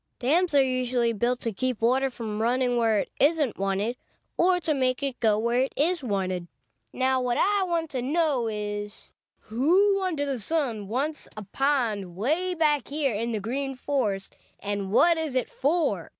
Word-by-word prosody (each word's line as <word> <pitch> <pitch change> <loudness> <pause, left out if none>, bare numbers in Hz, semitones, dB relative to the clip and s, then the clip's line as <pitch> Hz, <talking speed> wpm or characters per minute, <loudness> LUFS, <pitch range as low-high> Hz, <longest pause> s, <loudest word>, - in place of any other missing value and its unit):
"Dams 315 +6 +1
are 275 - +6
usually 250 -2 0
built 240 +3 -1
to 230 - -2
keep 255 +2 -2
water 260 +4 +2
from 220 -4 -5
running 245 +1 +1
where 225 -3 +2
it - - -8
isn't 290 - +2
wanted 195 +5 -1 0.4
or 360 +1 +3
to 315 -2 0
make 260 -1 0
it 270 -3 -3
go 220 -3 +3
where 235 +3 +1
it 265 - -1
is 330 +1 +1
wanted. 185 -5 -2 0.4
Now, 260 0 +1
what 245 -1 0
I 405 +1 +2
want 335 -4 -1
to 260 -3 -2
know 285 -3 +1
is, 205 -1 -5 0.3
who 365 - +2
under 330 -6 -1
the 275 -3 -2
sun 235 -5 -2
wants 280 +8 -3
a 215 - -5
pond 220 -6 -1
way 320 - 0
back 300 -4 +1
here 285 -3 -1
in 230 +3 -2
the 220 - -1
Green 270 +6 -3
Forest, 230 -8 -2 0.2
and 200 -1 -3
what 335 +8 +4
is 310 -5 -3
it 255 - -1
for? 320 +5 0
255 Hz, 180 wpm, -26 LUFS, 220-295 Hz, 0.4 s, are